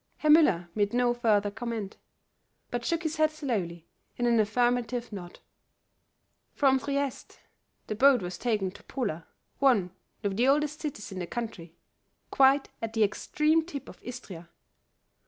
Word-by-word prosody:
Herr 305 - +3
Müller 245 - +5
made 205 +1 0
no 245 -1 +3
further 210 -4 +2
comment, 225 -2 -5 0.7
but 245 -1 -2
shook 335 +6 -1
his 315 0 -2
head 310 0 +4
slowly 210 - -3 0.3
in 245 - 0
an 235 -1 +4
affirmative 240 +2 +1
nod. 175 -3 -8 1.2
From 265 -2 +4
Trieste 280 0 -3 0.5
the - - -3
boat 255 0 +5
was 180 0 -5
taken 210 -6 0
to - - -15
Pola, 185 - -3 0.3
one 240 -10 +3 0.3
of 200 -1 -1
the 245 +3 +3
oldest 300 +2 +2
cities 275 -11 -5
in 190 - -5
the 175 - -4
country, 180 -8 -6 0.6
quite 270 +1 +4
at 225 -1 -4
the 220 - +3
extreme 305 +9 +1
tip 285 -5 -7
of - - -13
Istria. 195 -9 -9
240 Hz, 150 wpm, -28 LUFS, 205-275 Hz, 1.2 s, Müller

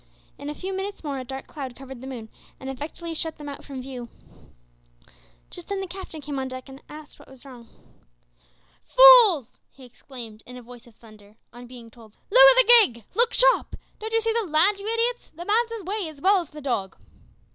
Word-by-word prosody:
In 285 - -7
a 300 - -6
few 380 +3 -6
minutes 395 0 -6
more 280 -3 -4
a - - -6
dark 265 +1 -8
cloud 265 -4 -9
covered 265 -1 -11
the 265 - -9
moon 235 -4 -8 0.3
and 265 0 -7
effectually 320 +5 -8
shut 320 0 -3
them 295 - -10
out 280 - -9
from 265 -3 -9
view. 250 -3 -9 1.4
Just 350 - -10
then 400 -1 -4
the 385 - -4
Captain 370 -4 -10
came 285 -1 -6
on 265 - -4
deck, 255 0 -9
and 270 +1 -13
asked 300 0 -13
what - - -17
was 265 0 -14
wrong. 245 -4 -14 1.1
"Fools!" 475 - +6
he 265 - -17
exclaimed, 235 -3 -12
in 250 0 -11
a 250 - -12
voice 245 +1 -15
of 230 - -20
thunder, 215 -2 -19 0.2
on 240 0 -12
being 240 -2 -13
told, 220 -2 -19
"lower - - +8
the - - +7
gig. 235 - -1
Look 475 +1 +2
sharp! - - +3 0.2
Don't 440 +1 -6
you 455 0 +1
see 450 0 -1
the 450 -5 -2
land, 360 +7 +2
you 415 +3 -4
idiots? 470 +1 -2
The 345 +2 -9
man's 455 +4 +1
away 390 -1 -4
as 305 -2 -14
well 385 +4 +3
as 335 - -12
the 300 - -12
dog." 205 -8 -4
290 Hz, 210 wpm, -23 LUFS, 250-395 Hz, 1.4 s, lower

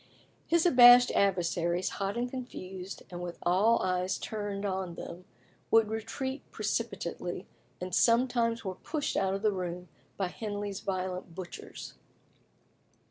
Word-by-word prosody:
His 335 0 +3
abashed 245 -5 +9
adversaries, 175 -2 +1
hot 200 +2 -3
and 240 +1 0
confused, 195 -7 -7
and 175 0 -6
with 175 -1 -5
all 205 +7 +3
eyes 185 0 0
turned 205 -2 -4
on 190 -3 -2
them, 175 +2 -8 0.4
would 225 -1 +5
retreat 230 +5 -3
precipitately, 200 -5 -3 0.3
and 180 0 -5
sometimes 235 0 +3
were 190 - -2
pushed 300 - -3
out 190 0 +1
of 195 - -5
the 215 - +4
room 180 -1 -4 0.3
by 190 -2 -1
Henley's 205 -1 -4
violent 185 -2 -4
butchers. 185 -2 -8
195 Hz, 130 wpm, -30 LUFS, 180-230 Hz, 0.4 s, abashed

